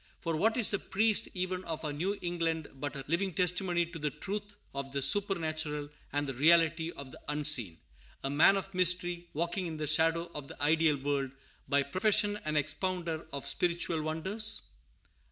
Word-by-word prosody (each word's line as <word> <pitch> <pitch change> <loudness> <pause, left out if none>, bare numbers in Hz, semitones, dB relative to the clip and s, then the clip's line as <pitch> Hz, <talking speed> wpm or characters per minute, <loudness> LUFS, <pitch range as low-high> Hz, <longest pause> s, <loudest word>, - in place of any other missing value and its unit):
For 165 -1 -2
what 220 +9 +2
is 230 - +3
the 200 - 0
priest 215 +2 +2
even 185 0 -2
of 160 -1 -5
our 150 - -2
New 185 +7 -1
England 165 -3 -1
but 145 +2 -5
a 135 -1 -6
living 175 +3 0
testimony 180 0 +2
to 170 -1 -9
the 150 0 0
truth 205 +6 -6 0.2
of 140 0 -5
the 140 - -1
supernatural 155 -3 0 0.2
and 145 +1 0
the 135 - -3
reality 165 +3 +4
of 140 -2 -9
the - - -12
unseen, 145 - +1 0.5
a 135 - -1
man 165 +7 +5
of 195 0 -5
mystery, 175 -1 +1
walking 175 +3 -1
in 160 -1 -5
the 155 - -2
shadow 165 +2 +2
of 145 -2 -7
the - - -11
ideal 155 0 +3
world, 140 -1 -1 0.4
by 140 0 +3
profession 205 +6 +2
an 155 0 -1
expounder 165 +2 -2
of 140 0 -5
spiritual 170 -2 0
wonders? 190 +8 +1
165 Hz, 175 wpm, -31 LUFS, 150-185 Hz, 0.5 s, man